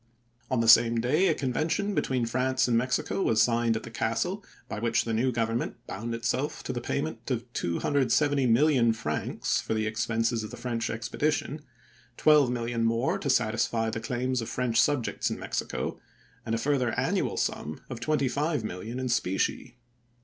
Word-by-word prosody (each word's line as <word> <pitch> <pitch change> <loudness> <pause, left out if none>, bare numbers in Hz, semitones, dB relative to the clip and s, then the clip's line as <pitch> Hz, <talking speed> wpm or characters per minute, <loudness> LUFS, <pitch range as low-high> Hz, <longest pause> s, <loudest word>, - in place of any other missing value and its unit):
On 130 -3 +1
the 115 - 0
same 115 0 +7
day 150 +11 +2
a 160 - +2
convention 155 +10 -1
be - - +2
tween 130 -3 -1
France 130 +3 +1
and 120 - +2
Mexico 125 +10 0
was 110 - +2
signed 115 0 +3
at 110 - -3
the 115 - -9
castle, 175 - -1 0.2
by - - -5
which 115 +1 +1
the 115 - -2
new 125 +4 +1
Government 115 0 -1
bound 115 +4 -4
itself 125 +5 -2
to 130 - -3
the 120 - -3
payment 140 +5 -3
of 120 -2 -1
270,000,000 130 - +2
francs 75 -8 -2
for 110 - -2
the 110 0 0
expenses 115 +1 0
of 105 - -6
the - - -9
French 120 -1 -2
expedition, 145 +6 -2 0.6
12,000,000 125 -6 +3
more 115 +2 +1
to 140 - -3
satisfy 115 -2 +1
the 115 - -3
claims 125 +2 -1
of 115 - -5
French 125 -2 +1
subjects 145 -6 0
in - - -3
Mexico, - - -3 0.5
and 115 - 0
a - - 0
further 130 -2 0
annual - - 0
sum 75 +1 -2
of 120 -3 -6
25,000,000 130 - -1
in 130 - -2
specie. 120 +2 -1
120 Hz, 165 wpm, -28 LUFS, 115-135 Hz, 0.6 s, same